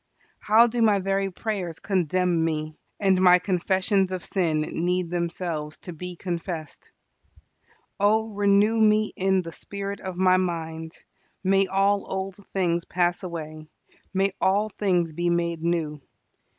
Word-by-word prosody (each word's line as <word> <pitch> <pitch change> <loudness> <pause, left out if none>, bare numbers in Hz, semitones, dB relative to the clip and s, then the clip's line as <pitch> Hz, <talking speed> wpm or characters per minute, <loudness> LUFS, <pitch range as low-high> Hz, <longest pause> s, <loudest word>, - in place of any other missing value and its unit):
How 220 +3 +5
do 240 0 -1
my 215 -3 +5
very 195 0 0
prayers 185 -4 -4
condemn 180 -2 +1
me; 155 -1 -2 0.2
and 190 -2 +3
my 180 -1 +7
confessions 190 +1 +1
of 185 -2 -4
sin 165 -5 0
need 175 +2 -1
themselves 170 -3 -3
to 180 - -8
be 180 +2 -7
confessed! 170 -3 -5 1.1
Oh 220 +2 +3
renew 205 +2 +3
me 215 0 +3
in 190 0 +1
the 165 - -7
spirit 200 +3 -6
of 185 -1 -5
my 185 0 +4
mind. 165 -3 -3 0.5
May 195 0 +3
all 195 +1 +1
old 190 0 -3
things 175 -3 0
pass 175 0 0
away; 155 -3 -7 0.4
may 195 +1 +1
all 200 +3 +2
things 180 -6 0
be 175 +2 0
made 170 -1 0
new. 160 -3 -1
185 Hz, 140 wpm, -25 LUFS, 170-195 Hz, 1.1 s, my